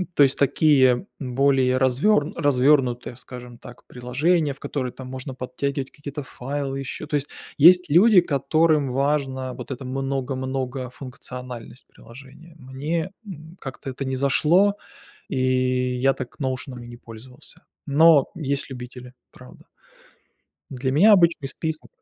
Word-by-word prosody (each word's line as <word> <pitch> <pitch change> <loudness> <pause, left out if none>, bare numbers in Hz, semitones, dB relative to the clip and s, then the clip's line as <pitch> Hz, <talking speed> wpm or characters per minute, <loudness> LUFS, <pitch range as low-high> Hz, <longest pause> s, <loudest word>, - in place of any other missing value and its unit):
то 145 - +6
есть, 135 - +2
такие 140 0 +3
более 130 -1 +2
развёр 145 +6 +2
развёрнутые, 130 -4 +2
скажем 125 -1 -11
так, 120 0 -14
приложения, 140 +6 0
в 135 - -20
которые 130 -3 -4
там 130 +1 -10
можно 130 +1 -7
подтягивать 135 +2 -4
какие-то 145 0 -7
файлы 135 +1 -5
ещё. 135 +3 -6
То 150 - -2
есть 145 0 -5 0.3
есть 180 +2 +7
люди, 190 +4 +6
которым 150 -1 +1
важно 135 -1 -1
вот - - -9
эта 130 0 -6
много 135 0 -3
много 130 0 -4
функциональность 125 -2 -9
приложения. 140 +7 -15
Мне, 150 +7 -4
м, 160 -3 -11
как-то 135 +1 -8
это 135 +2 -6
не 130 0 -2
зашло, 165 +9 +3 0.5
и - - -4 0.6
я 135 +1 +3
так 130 -2 -9
"Ноушеном" 130 -2 -4
и - - -11
не 120 0 -11
пользовался. 120 +2 -14 0.2
Но 150 0 +5
есть 140 -3 -3
любители, 125 0 -9 0.2
правда. 65 - -16 1.0
Для 130 0 -3
меня 200 +10 +6
обычный 170 -6 +3
список 160 +3 -5
135 Hz, 135 wpm, -23 LUFS, 130-150 Hz, 1.0 s, есть